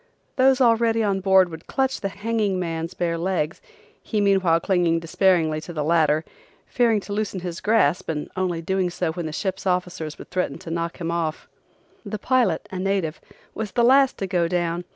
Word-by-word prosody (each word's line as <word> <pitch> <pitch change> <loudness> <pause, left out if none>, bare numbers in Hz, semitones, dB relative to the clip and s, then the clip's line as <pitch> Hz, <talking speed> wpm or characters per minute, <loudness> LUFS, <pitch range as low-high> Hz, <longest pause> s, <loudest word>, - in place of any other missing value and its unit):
Those 265 0 +4
already 230 -2 +3
on 200 -2 +1
board 190 -1 +4
would 160 -1 -10
clutch 265 -1 -1
the 195 - -1
hanging 205 -1 -1
man's 165 0 -3
bare 170 -1 -1
legs, 170 -3 -1 0.4
he 215 - -2
meanwhile 190 -5 +3
clinging 175 -2 +1
despairingly 165 -2 +1
to 175 - -8
the 150 -2 -2
ladder, 155 -1 +2 0.4
fearing 230 -3 +2
to 200 +2 -7
loosen 205 -3 -2
his 175 -1 -5
grasp 210 -9 +2
and 150 -2 -3
only 180 -3 -1
doing 190 +1 0
so 175 -1 -2
when 165 0 -4
the - - -5
ship 190 +4 -3
officers 180 -4 -2
would - - -12
threaten 180 -6 -1
to 165 - -9
knock 170 0 -3
him 165 -1 -2
off. 165 -2 -3 0.6
The 215 - -5
pilot, 235 -6 +1
a 185 - -4
native, 185 -4 -1 0.3
was 220 -2 -5
the 240 - +2
last 265 +2 +5
to 195 - -2
go 180 -3 +1
down. 175 0 -1
180 Hz, 190 wpm, -23 LUFS, 165-205 Hz, 0.6 s, last